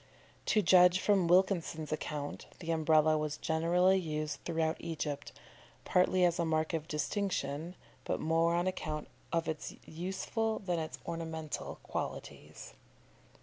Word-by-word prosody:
To 215 - +3
judge 180 0 +6
from 195 -3 +3
Wilkinson's 175 -4 +2
account, 150 -1 -4
the 165 -2 -4
Umbrella 155 -1 +4
was 150 -1 -2
generally 175 +4 +3
used 155 -4 -3
throughout 160 -1 0
Egypt, 150 -3 -4 0.5
partly 180 0 +3
as 175 0 +1
a - - +3
mark 160 0 0
of 160 -1 -2
distinction, 160 -1 -2 0.3
but - - -2
more 165 +2 +2
on 175 +1 +1
account 155 -5 -3 0.2
of 165 -1 0
its 155 -1 -4
useful 190 +6 -2
than 180 -4 -2
its 155 -1 -5
ornamental 160 -2 -4
qualities. - - -6
165 Hz, 130 wpm, -33 LUFS, 155-180 Hz, 0.5 s, judge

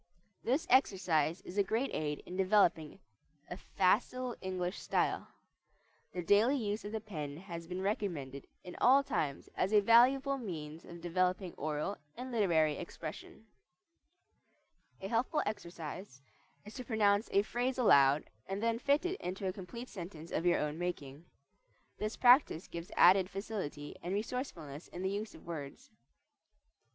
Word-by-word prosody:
This 275 +8 +1
exercise 185 - +2
is 190 +3 -5
a - - +5
great 225 +7 -1
aid 150 -1 -2
in 180 - -7
developing 185 -5 +2 0.5
a - - -3
facile 240 +7 0
English 185 -1 -3
style. - - 0 0.8
The 180 - -4
daily 210 +10 +4
use 210 -3 -2
of 205 - -6
the 220 - -2
pen 155 -9 -6
has 170 -2 -8
been 180 +2 -4
recommended 160 -10 -3 0.2
in 180 - -9
all 270 +3 +6
times 140 - -2
as 190 - 0
a 210 - +6
valuable 265 +6 +5
means 160 -7 -7
of 170 0 -10
developing 180 +1 0
oral 155 +6 -3 0.2
and 255 +1 -6
literary 165 -9 +2
expression. 170 +4 -8 1.6
A 190 - -4
helpful 240 +8 +1
exercise 170 -6 -6 0.4
is 210 - -10
to 255 - -6
pronounce 210 -2 +2
a 200 - +4
phrase 245 +4 -1
aloud 140 - +5 0.2
and 195 +3 -3
then 230 0 +1
fit 285 +6 +2
it 365 +2 -2
into 190 +2 -4
a 185 - -1
complete 235 +6 -8
sentence 170 -5 -9
of 165 - 0
your 175 - +4
own 150 +2 -2
making. 160 -4 -5 0.7
This 215 +1 -3
practice 245 - +5
gives 170 +1 -7
added 185 +1 +6
facility 195 -8 -5
and 180 +3 -3
resourcefulness 190 - -5
in 180 - -7
the 190 - 0
use 210 +2 -4
of - - -15
words. 165 - -7
190 Hz, 150 wpm, -33 LUFS, 165-225 Hz, 1.6 s, all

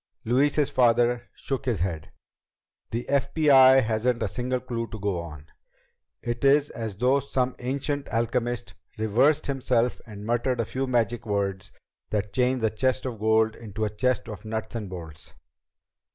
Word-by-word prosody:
Louise's 140 +5 +2
father 120 0 +2
shook 135 -2 -4
his 115 -8 -1
head. 85 -5 -3 0.8
"The 120 +2 -3
FBI 135 -2 +5
hasn't 115 +2 0
a - - 0
single 125 +5 -2
clue 120 -2 -4
to 110 - -7
go 100 -3 -1
on. 75 -3 -9 0.8
It 120 +1 -3
is 145 +1 +4
as 110 -4 -5
though 130 +5 +3
some 130 -2 -1
ancient 140 +3 -2
alchemist 115 -3 -1 0.2
reversed 120 +8 +2
himself 125 -3 0
and 105 -2 -9
muttered 120 +2 0
a 115 - +1
few 130 +4 -3
magic 120 -2 0
words 100 -2 -2 0.4
that 105 -1 -2
changed 125 -1 +1
a 110 - +2
chest 130 +4 0
of 120 -4 -4
gold 110 0 +2
into 110 -1 -4
a 105 - -2
chest 125 +1 0
of 105 -3 -8
nuts 110 0 -4
and 105 -4 -4
bolts." 80 -3 -10
120 Hz, 155 wpm, -26 LUFS, 110-130 Hz, 0.8 s, FBI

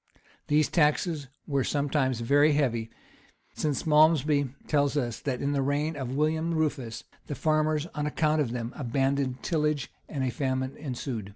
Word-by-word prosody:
These 150 -1 +3
taxes 150 0 +1 0.2
were 140 -2 0
sometimes 140 -4 0
very 145 +5 +4
heavy; 120 -6 0 0.6
since 150 +2 -2
Malmsbury 150 -2 +4 0.2
tells 145 -1 +2
us 120 -5 -1
that, 130 -3 -3
in 140 - +1
the 140 -1 +1
reign 145 +3 0
of 130 -2 -4
William 160 +3 +1
Rufus, 140 -7 -2 0.2
the 145 - -4
farmers, 155 +1 +1
on 150 0 -2
account 155 0 +1
of 135 - 0
them, 120 0 -4
abandoned 135 0 -1
tillage, 150 -5 0 0.2
and 140 -4 -2
a 130 - 0
famine 130 0 -2
ensued. 125 -7 -5
145 Hz, 155 wpm, -28 LUFS, 130-150 Hz, 0.6 s, very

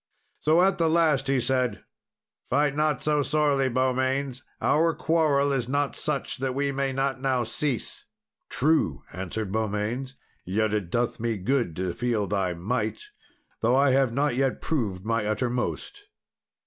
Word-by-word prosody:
So, 160 +4 +4
at 195 0 +2
the 165 -1 +3
last, 155 -5 +2
he 135 -1 +2
said, 125 0 0 0.7
"Fight 145 +1 +2
not 150 -3 +1
so 150 -1 +2
sorely, 145 -2 +2
Beaumains; 130 +1 0 0.2
our 165 +2 +2
quarrel 150 -4 +2
is 125 -3 -1
not 140 +1 0
such 150 -3 -2
that 130 -1 -2
we 140 0 0
may 135 0 -1
not 135 0 -1
now 130 -2 +1
cease." 125 +2 -3 0.4
"True," 145 - +1
answered 95 +3 -4
Beaumains; 110 +5 -2 0.3
"yet 105 +3 0
it 100 -5 -1
doth 120 +5 -1
me 115 -1 -1
good 115 - 0
to 90 0 -2
feel 115 -4 0
thy 95 -3 -1
might, 105 +4 -2 0.6
though 120 +3 +2
I 140 0 +4
have 135 -2 +3
not 140 +1 +1
yet 135 0 0
proved 105 - -2
my 115 -1 0
uttermost." 120 - -2
130 Hz, 150 wpm, -26 LUFS, 110-140 Hz, 0.7 s, So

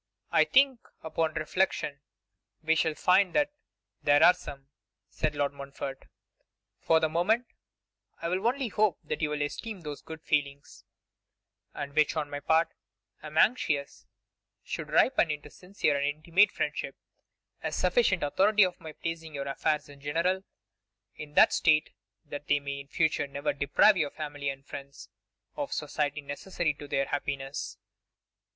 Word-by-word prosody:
'I - - +5
think, 270 -2 +4 0.2
upon 160 0 -1
reflection, 155 -4 -1 0.6
we 160 +1 +3
shall 160 -1 +1
find 185 +2 +3
that 295 0 +3 0.5
there 145 0 +5
are 180 - +9
some,' 140 -6 -10 0.4
said 150 - -1
Lord 145 -1 0
Montfort. 140 -1 -7 0.7
'For 160 - +3
the 160 - +2
moment 190 +10 +1 0.7
I 165 - -3
will 185 +5 0
only 255 0 0
hope 210 -5 +2
that 155 - -4
you 150 - +1
will 150 -1 -1
esteem 200 +7 -5
those 150 -3 -7
good 160 -1 -10
feelings, 140 -2 -2 0.9
and 140 -1 -5
which, 155 +1 +3
on 150 -2 -2
my 145 - -3
part, 160 +3 +2 0.5
I 155 - -8
am 155 +1 -8
anxious 150 - +1 0.6
should - - -5
ripen 250 -10 +4
into 150 -1 -5
sincere 180 -5 -1
and 140 0 0
intimate 165 +7 +3
friendship, - - -3 0.7
as - - -3
sufficient 470 - +2
authority 200 +7 +4
for 180 -1 -5
my 155 -1 -8
placing 165 -1 -5
your 140 0 -4
affairs 150 +2 0
in 140 -1 -14
general 170 +6 0 0.7
in 150 -1 -10
that - - +7
state 155 -2 +3 0.3
that 145 -1 -7
they 145 - +3
may 140 0 -5
in 140 - -10
future 155 -1 +1
never 140 0 -2
deprive 145 +8 +4
your 150 -4 +1
family 145 -2 -4
and 135 0 -7
friends 140 -1 -9 0.5
of 290 -2 -4
society 150 -1 -2
necessary 155 +3 -2
to 145 0 -10
their 135 0 0
happiness. 140 -1 -4
155 Hz, 155 wpm, -29 LUFS, 145-180 Hz, 0.9 s, are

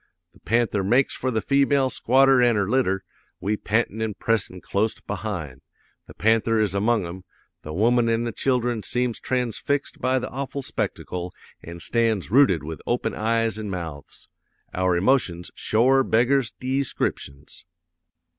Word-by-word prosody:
The 100 - -21
panther 115 -4 0
makes 125 +7 +2
for 130 - -2
the 110 -3 -1
female 140 -1 +3
squatter 135 +1 +4
an' 120 -2 +4
her 100 -2 +1
litter, 95 -5 +1 0.4
we 105 +2 -1
pantin' 110 +1 -1
an' 110 -2 -2
pressin' 110 -5 -1
clost 105 +4 -2
behind. 90 - -5 0.5
The - - -13
panther 115 +1 +2
is 105 -3 +1
among 105 0 +1
'em; 90 +2 -8 0.4
the 75 - -8
woman 115 +7 +2
an' 115 0 +1
the 120 - -2
children 120 -2 0
seems 125 +1 -2
transfixed 130 +3 -2
by 130 +1 +2
the 125 - -3
awful 140 +1 -4
spectacle 90 -7 -4 0.3
an' 85 +1 -9
stands 110 -5 0
rooted 115 - +4
with 80 +1 -7
open 120 - -1
eyes 115 -1 0
an' 105 -1 -5
mouths. 80 -6 -7 0.5
Our 90 -1 +1
emotions 90 -5 +1
shore 130 +5 +3
beggars 125 +2 +2
deescriptions. 125 - -3
115 Hz, 145 wpm, -24 LUFS, 95-125 Hz, 0.5 s, squatter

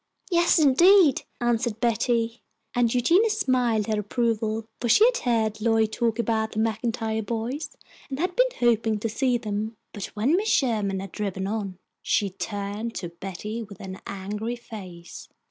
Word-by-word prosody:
"Yes, 345 0 +4
indeed!" 325 +2 +5
answered 235 -2 0
Betty, 235 0 0 0.3
and 240 -2 +2
Eugenia 340 - +4
smiled 255 - +1
her 215 0 0
approval, 220 0 -1
for 240 - -2
she 425 - +7
had - - +3
heard 220 -3 0
Lloyd 225 -1 +2
talk 230 -1 0
about 220 -2 0
the - - -8
MacIntyre 225 0 -1
boys, 240 +8 -4 0.3
and 265 - -4
had 360 +4 -1
been - - +4
hoping 225 -2 +2
to 210 - -2
see 245 +3 +1
them. 215 0 -4 0.2
But 205 -3 -5
when 240 +10 +2
Mrs. 410 +4 0
Sherman 210 -7 0
had 195 - -8
driven 195 -2 -3
on, 200 -3 -3 0.2
she 200 -2 +1
turned 205 +3 -4
to 175 - -4
Betty 195 +6 -6
with 200 -4 -10
an 190 -1 -8
angry 210 +4 -4
face. 185 -8 -10
225 Hz, 160 wpm, -25 LUFS, 210-245 Hz, 0.3 s, she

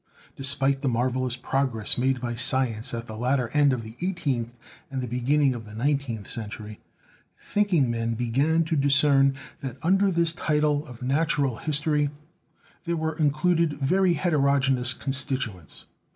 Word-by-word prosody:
Despite 135 0 +1
the 140 - 0
marvelous 125 +1 0
progress 125 -4 -1
made 130 +1 0
by 120 -1 -3
science 120 0 +2
at 115 0 -5
the 110 - -8
latter 125 +1 0
end 145 0 +3
of 125 -3 -2
the 110 +1 -10
eighteenth 145 -11 -2 0.4
and 135 -2 -4
the 125 - -3
beginning 130 +4 +1
of 120 -2 -7
the 105 0 -11
nineteenth 125 -4 -1
century, 110 -1 -6 0.6
thinking 180 -12 +1
men 115 0 -2
began 135 +8 +1
to 160 0 -2
discern 140 -1 +4 0.2
that 135 -2 -6
under 195 +4 +3
this 170 -2 +2
title 150 -2 0
of 125 0 -11
"Natural 140 -2 0
History" 150 0 0 0.8
there 170 0 -1
were 160 0 -2
in 155 -2 +2
cluded 165 +1 +1
very 175 +6 +2
heterogeneous 140 -6 +2
constituents. 130 - -3
135 Hz, 150 wpm, -25 LUFS, 120-150 Hz, 0.8 s, discern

